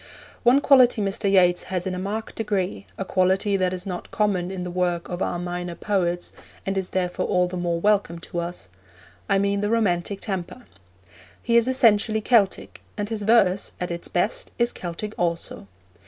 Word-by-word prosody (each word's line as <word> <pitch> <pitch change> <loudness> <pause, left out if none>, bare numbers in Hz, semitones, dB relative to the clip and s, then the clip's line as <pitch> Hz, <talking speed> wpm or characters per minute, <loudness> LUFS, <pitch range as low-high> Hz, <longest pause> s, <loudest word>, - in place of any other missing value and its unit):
One 255 +3 +5
quality 255 -5 +5
Mr. 200 0 0
Yeats 180 -2 +4
has 180 -2 -2
in 190 - -2
a 180 - -4
marked 210 +4 -4
degree, 190 - -2
a - - -3
quality 190 +2 +2
that 185 -1 +1
is 185 0 -5
not 180 -2 -5
common 195 -4 0
in 190 -1 -5
the 180 - -5
work 175 -1 -1
of 175 +1 -4
our 175 - -1
minor 175 0 -4
poets, 175 -4 -1 0.3
and 195 - -1
is 190 -1 -1
therefore 180 -1 -1
all 180 -1 +2
the 180 - -6
more 175 -1 -1
welcome 200 -3 +2
to 170 +1 -6
us 170 - -5 0.6
I 200 - +4
mean 200 0 +1
the 205 - 0
romantic 200 -4 0
temper. 195 +5 -5 0.8
He 235 - +1
is 235 +1 +5
essentially 220 -4 +3
Celtic, 215 -3 +1 0.2
and 205 0 -3
his 220 -2 -3
verse, 205 -3 +3
at 180 -1 -3
its 170 0 -4
best, - - -1
is 235 0 +2
Celtic 185 +5 -6
also. 170 - -2
190 Hz, 185 wpm, -24 LUFS, 175-210 Hz, 0.8 s, One